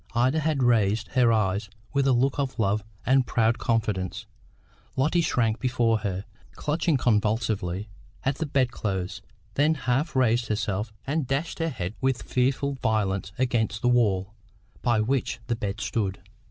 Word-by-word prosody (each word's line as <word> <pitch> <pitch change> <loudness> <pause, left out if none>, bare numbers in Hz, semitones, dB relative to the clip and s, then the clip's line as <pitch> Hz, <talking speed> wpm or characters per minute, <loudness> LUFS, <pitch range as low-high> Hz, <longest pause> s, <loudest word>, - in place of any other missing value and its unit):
Ida 130 +6 +3
had 155 -3 +1
raised 110 -3 +2
her 125 -3 +4
eyes 105 -1 +1 0.2
with 140 -1 +2
a - - +5
look 130 +3 +2
of 135 -2 -2
love 105 -1 +1 0.2
and 130 0 +3
proud 115 0 +2
confidence. 105 -3 -1 0.7
Lotty 155 +6 +2
shrank 115 -8 +1
before 120 -3 +2
her, 100 -2 -3 0.3
clutched 155 0 +1
convulsively 105 -4 0 0.4
at 135 +1 0
the 160 - -2
bed 130 -3 +1
clothes, 95 -6 -3 0.3
then 150 +3 +3
half 135 +2 -1
raised 120 -2 +3
herself 105 -1 -1
and 145 -1 -1
dashed 140 +7 -2
her 165 0 +1
head 95 - -4
with 130 -1 0
fearful 135 +2 0
violence 100 -4 0
against 115 -4 0
the 125 - +4
wall 100 -5 +2 0.5
by 115 -3 +2
which 125 +3 0
the 120 0 -1
bed 105 -1 -4
stood. 100 -2 -1
120 Hz, 155 wpm, -26 LUFS, 105-130 Hz, 0.7 s, a